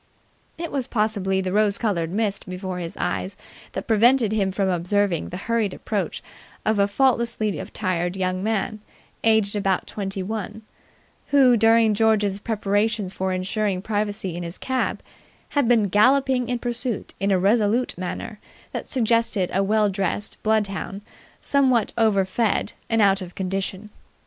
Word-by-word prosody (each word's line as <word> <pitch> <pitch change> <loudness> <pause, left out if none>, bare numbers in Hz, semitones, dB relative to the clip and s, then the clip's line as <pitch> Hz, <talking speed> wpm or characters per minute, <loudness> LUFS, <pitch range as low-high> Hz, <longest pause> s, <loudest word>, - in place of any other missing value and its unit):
It 335 0 -4
was 270 -3 -2
possibly 205 -5 0
the 185 0 -3
rose 210 -1 +3
coloured 175 -7 -1
mist 205 0 -2
before 185 0 -4
his 170 -1 -6
eyes 90 +2 -2 0.4
that - - -4
prevented 230 +1 +4
him 200 -3 +1
from 195 +1 0
observing 180 0 0
the 180 - -6
hurried 225 -4 0
approach 205 -3 -3 0.4
of 215 -1 +2
a 200 - +4
faultlessly 235 - +1
attired 180 -1 -2
young 185 0 -1
man, 215 0 -1 0.4
aged 220 -2 +3
about 195 -2 0
twenty 195 -2 -4
one, 215 +1 -5 0.6
who 265 -4 +5
during 225 0 +4
George's 210 -2 +2
preparations 205 -2 -1
for 190 0 -2
ensuring 185 +1 -1
privacy 205 -4 -2
in 175 - -4
his 170 +1 -6
cab 260 -1 -2 0.5
had 285 -5 +1
been 235 -3 +4
galloping 250 +5 +3
in 245 - 0
pursuit 240 -1 -3
in 195 - 0
a 195 - +4
resolute 215 +5 +2
manner 185 +3 -5 0.3
that - - -5
suggested 230 -6 +1
a 195 - +2
well 210 +1 +3
dressed 195 +1 -2
bloodhound 205 -2 -1 0.4
somewhat 260 -6 +2
overfed 210 0 +1 0.2
and 225 -2 +3
out 195 -1 +3
of 180 -1 -8
condition. 195 +2 -3
205 Hz, 145 wpm, -23 LUFS, 190-225 Hz, 0.6 s, who